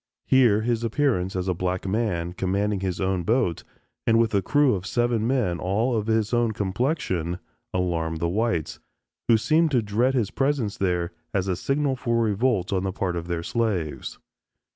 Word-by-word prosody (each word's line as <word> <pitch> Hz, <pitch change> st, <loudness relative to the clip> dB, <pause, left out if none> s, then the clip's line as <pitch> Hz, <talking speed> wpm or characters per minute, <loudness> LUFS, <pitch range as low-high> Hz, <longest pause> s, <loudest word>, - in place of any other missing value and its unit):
Here 120 Hz, -5 st, +4 dB
his 115 Hz, 0 st, 0 dB
appearance 115 Hz, -6 st, 0 dB
as 90 Hz, 0 st, -2 dB
a 90 Hz, -, +2 dB
black 90 Hz, +2 st, -2 dB
man 95 Hz, -5 st, -1 dB
commanding 100 Hz, +2 st, 0 dB
his 95 Hz, -2 st, -3 dB
own 95 Hz, -1 st, 0 dB
boat 110 Hz, -2 st, 0 dB, 0.4 s
and 115 Hz, -, +5 dB
with 115 Hz, -1 st, +2 dB
a 100 Hz, -, +3 dB
crew 145 Hz, +5 st, +3 dB
of 95 Hz, -1 st, -3 dB
seven 120 Hz, -1 st, +1 dB
men 115 Hz, -10 st, 0 dB
all 110 Hz, +7 st, 0 dB
of 110 Hz, -1 st, -1 dB
his 110 Hz, 0 st, +1 dB
own 120 Hz, -2 st, +2 dB
complexion, 95 Hz, -, -1 dB, 0.3 s
alarmed 85 Hz, -3 st, -1 dB
the 85 Hz, -, 0 dB
whites, 90 Hz, -4 st, -1 dB, 0.5 s
who 115 Hz, -, +6 dB
seemed 160 Hz, +8 st, +3 dB
to 125 Hz, -6 st, +2 dB
dread 120 Hz, +6 st, +1 dB
his 110 Hz, -6 st, 0 dB
presence 135 Hz, -7 st, 0 dB
there 90 Hz, -2 st, -1 dB, 0.2 s
as 95 Hz, -2 st, +1 dB
the 95 Hz, -2 st, 0 dB
signal 135 Hz, +7 st, 0 dB
for 120 Hz, -2 st, -1 dB
a 115 Hz, -2 st, +2 dB
revolt 105 Hz, -3 st, 0 dB
on 95 Hz, -, +1 dB
the 95 Hz, 0 st, -2 dB
part 90 Hz, -2 st, -2 dB
of 85 Hz, 0 st, -4 dB
their 85 Hz, -1 st, -2 dB
slaves. 90 Hz, -, -2 dB
105 Hz, 185 wpm, -25 LUFS, 90-120 Hz, 0.5 s, who